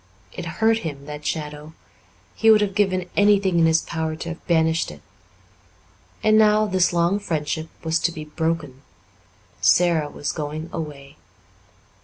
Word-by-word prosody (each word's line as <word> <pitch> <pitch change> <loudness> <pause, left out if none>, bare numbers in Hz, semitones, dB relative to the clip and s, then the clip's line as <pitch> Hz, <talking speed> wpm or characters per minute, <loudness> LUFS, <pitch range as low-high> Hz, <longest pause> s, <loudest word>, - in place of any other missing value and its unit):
It - - -6
hurt 225 0 +3
him, 145 -7 -6
that 150 0 -7
shadow; 150 0 -5 0.6
he 225 - +2
would 215 -1 +7
have 200 -2 0
given 185 -3 0
anything 200 -3 +3
in 165 - +5
his 160 0 +2
power 160 -1 -3
to 165 +1 -6
have 170 - -9
banished 160 -1 +2
it. - - -12 1.2
And 215 0 +5
now 215 0 +4
this 185 -3 +2
long 175 +3 +1
friendship 160 -3 -3
was 160 0 +1
to 170 - 0
be 155 -3 -8
broken. 150 -4 -3 0.8
Sara 155 - +3
was 145 - -4
going 155 +1 -5
away. 145 -2 -7
165 Hz, 150 wpm, -22 LUFS, 150-190 Hz, 1.2 s, would